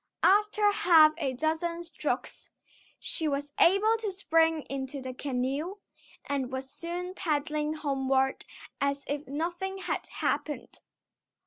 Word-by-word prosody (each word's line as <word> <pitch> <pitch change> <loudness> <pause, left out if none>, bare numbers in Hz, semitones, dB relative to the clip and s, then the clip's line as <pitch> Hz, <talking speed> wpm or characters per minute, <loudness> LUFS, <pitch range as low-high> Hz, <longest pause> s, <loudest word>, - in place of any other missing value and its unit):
After 420 +1 +4
half 325 -6 +6
a 275 -5 -1
dozen 320 +5 -1
strokes, 340 - -3 0.5
she 485 -10 -3
was 285 0 -2
able 420 +5 +5
to 430 -3 -2
spring 325 -4 +2
into 270 0 -5
the 260 -1 -6
canoe, 275 +7 -2 0.5
and 270 -3 -2
was 260 0 -4
soon 355 +2 -5
paddling 305 -3 -1
homeward 270 -3 0 0.4
as 280 0 0
if 290 +1 -3
nothing 345 +7 -3
had 385 - -3
happened. 295 - -3
310 Hz, 120 wpm, -29 LUFS, 280-355 Hz, 0.5 s, half